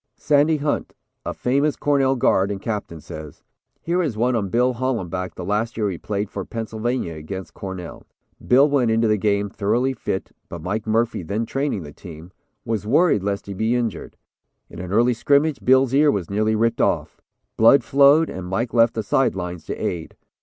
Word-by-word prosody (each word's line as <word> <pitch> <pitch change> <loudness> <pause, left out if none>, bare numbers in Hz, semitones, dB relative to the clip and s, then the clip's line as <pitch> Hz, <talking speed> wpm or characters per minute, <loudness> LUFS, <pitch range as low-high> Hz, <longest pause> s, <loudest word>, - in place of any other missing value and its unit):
Sandy 150 +2 +3
Hunt, 145 0 -2 0.3
a - - -3
famous 140 +4 0
Cornell 135 -2 +2
guard 100 -5 +2
and 100 -1 -3
captain, 105 -6 -4
says: 75 -1 -10 0.4
"Here 175 +2 0
is 140 -11 -2
one 120 +2 +1
on 100 -4 -1
Bill 125 +4 +2
Hollenback, 95 -8 -3
the 90 - -6
last 110 +4 -1
year 105 -3 0
he 85 - -6
played 105 0 -3
for 100 - -4
Pennsylvania 115 -3 -3
against 85 +5 -7
Cornell. 95 -3 -8 0.4
Bill 135 +4 +6
went 140 -5 +2
into 115 0 +2
the 105 -1 +2
game, 100 0 +1
thoroughly 115 +6 0
fit, 95 -5 -4 0.2
but 85 -2 -8
Mike 105 +5 -3
Murphy, 115 0 +1
then 100 +7 -2
training 135 - -2
the 75 -1 -10
team, 85 -1 -11 0.3
was 110 -2 -2
worried 145 - +3
lest 100 0 -3
he 100 - -6
be 110 +5 0
injured. 115 -7 -3 0.5
In - - -9
an 90 0 -6
early 120 +4 +3
scrimmage 140 +4 +2
Bill's 130 0 +4
ear 145 +2 +5
was 100 - -2
nearly 110 +2 +1
ripped 115 +2 +1
off. - - -1 0.3
Blood 115 +4 +6
flowed 140 +6 +5
and 90 -1 -6
Mike 115 +6 -2
left 115 -1 +4
the 110 - -2
side 135 +2 +1
lines 90 -3 -5
to - - -4
aid. 85 -2 -4
110 Hz, 190 wpm, -22 LUFS, 95-130 Hz, 0.5 s, Bill